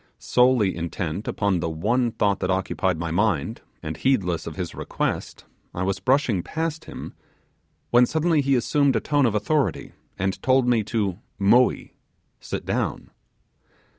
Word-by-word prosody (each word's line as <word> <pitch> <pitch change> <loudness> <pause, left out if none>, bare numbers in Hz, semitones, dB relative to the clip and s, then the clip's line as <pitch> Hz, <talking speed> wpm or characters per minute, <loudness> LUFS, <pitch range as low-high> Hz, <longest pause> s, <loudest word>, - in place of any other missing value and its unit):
Solely 125 -6 +3
intent 85 +2 -4
upon 100 -4 0
the 80 - -2
one 115 +10 +1
thought 100 -3 +1
that 90 - -2
occupied 95 -1 0
my 85 0 -3
mind, 85 - 0 0.2
and 75 0 -4
heedless 95 -11 0
of - - -6
his - - -4
request, - - -3 0.3
I 90 - -2
was 95 +1 -1
brushing 130 -7 +2
past 160 - -4
him, - - -8 0.8
when 120 0 +6
suddenly 160 -1 +2
he 135 0 +2
assumed 140 +2 +2
a - - +3
tone 145 +2 +2
of 110 - -1
authority, 140 +8 0 0.3
and 95 0 -2
told 130 -1 +3
me 120 -3 +3
to 100 -5 -1 0.2
'moee' 120 +6 +3 0.5
(sit - - -5
down). - - -2
110 Hz, 150 wpm, -24 LUFS, 95-130 Hz, 0.8 s, when